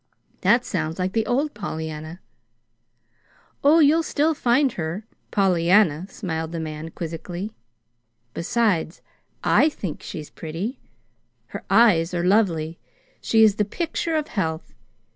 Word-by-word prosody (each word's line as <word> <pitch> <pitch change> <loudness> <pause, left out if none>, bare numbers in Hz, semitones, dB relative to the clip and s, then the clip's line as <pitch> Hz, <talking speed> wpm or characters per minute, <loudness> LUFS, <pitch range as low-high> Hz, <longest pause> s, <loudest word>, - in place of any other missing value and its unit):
"That 240 +1 +3
sounds 160 -3 -2
like 185 +1 -2
the 225 -1 0
old 280 +5 0
Pollyanna." 160 -3 -6 1.4
"Oh, 295 +3 +6
you'll 315 +1 +5
still 320 0 +1
find 260 0 +2
her 175 +4 -4 0.2
Pollyanna," 180 -3 +3
smiled 160 -4 -4
the 165 - -3
man, 155 0 -5
quizzically. 175 +5 -6 0.8
"Besides, 195 -5 0 0.4
I 310 - +4
think 190 - -6
she's 155 -2 -8
pretty. 175 - -5 0.7
Her - - -7
eyes 185 -5 +4
are 170 - 0
lovely. 170 -5 +1 0.4
She 225 -1 +4
is 215 -2 +4
the 210 - +3
picture 325 - -2
of 305 -1 -1
health. 160 -6 -3
190 Hz, 125 wpm, -23 LUFS, 160-235 Hz, 1.4 s, Oh